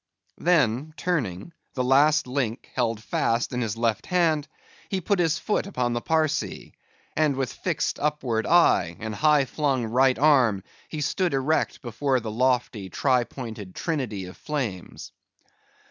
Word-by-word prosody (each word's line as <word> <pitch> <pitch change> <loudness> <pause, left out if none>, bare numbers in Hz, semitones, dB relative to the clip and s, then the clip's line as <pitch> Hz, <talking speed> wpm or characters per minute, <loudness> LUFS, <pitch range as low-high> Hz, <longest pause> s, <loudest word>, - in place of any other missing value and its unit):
Then 150 -3 +1
turning—the 130 - -3
last 145 +4 +4
link 125 -3 -3
held 115 -2 -1
fast 115 +3 0
in 125 - -1
his 115 -2 -2
left 115 -2 0
hand, 160 -5 +2 0.4
he 190 - -1
put 190 +2 0
his 165 -2 +2
foot 210 - -1
upon 125 -10 -1
the 120 - -2
Parsee; 160 0 -1 0.4
and 150 -3 +2
with 130 -2 -2
fixed - - -2
upward 135 -7 -1
eye, 90 - +4
and 110 -1 -4
high 150 +4 +3
flung 135 -3 0
right 130 +3 +3
arm, 130 -10 +4 0.3
he 155 - -4
stood 170 +2 0
erect 135 +4 0
before 130 +3 0
the 110 -2 -5
lofty 120 -4 0
tri 125 +4 +2
pointed 110 -8 -8
trinity 125 - -3
of 90 - -10
flames. 125 - -5
130 Hz, 145 wpm, -25 LUFS, 115-155 Hz, 0.4 s, last